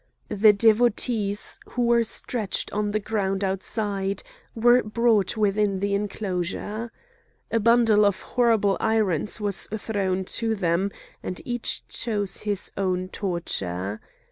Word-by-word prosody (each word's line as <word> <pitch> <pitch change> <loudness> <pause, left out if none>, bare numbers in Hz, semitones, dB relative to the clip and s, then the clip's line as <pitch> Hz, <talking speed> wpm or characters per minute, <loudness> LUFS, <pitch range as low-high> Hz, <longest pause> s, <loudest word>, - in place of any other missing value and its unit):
The 210 +1 +5
Devotees, 215 -1 +2
who 245 - -1
were 235 0 +4
stretched 220 -2 -1
on 210 0 -1
the 215 +1 0
ground 200 -2 -2
outside, 195 +1 -2 0.3
were 240 +2 +5
brought 220 -2 +1
within 205 -2 +1
the 200 +1 -1
enclosure. 205 +2 -3 0.6
A 230 - +2
bundle 225 -1 +4
of 200 -2 +2
horrible 225 -5 +3
irons 215 -4 0
was 205 -2 +1
thrown 200 -3 -2 0.2
to 225 -1 0
them, 185 0 0 0.3
and 180 - -5
each 240 -1 -2
chose 205 -4 -2
his 205 -2 -2
own 185 -1 -1
torture. 105 - -2
205 Hz, 120 wpm, -24 LUFS, 195-225 Hz, 0.6 s, The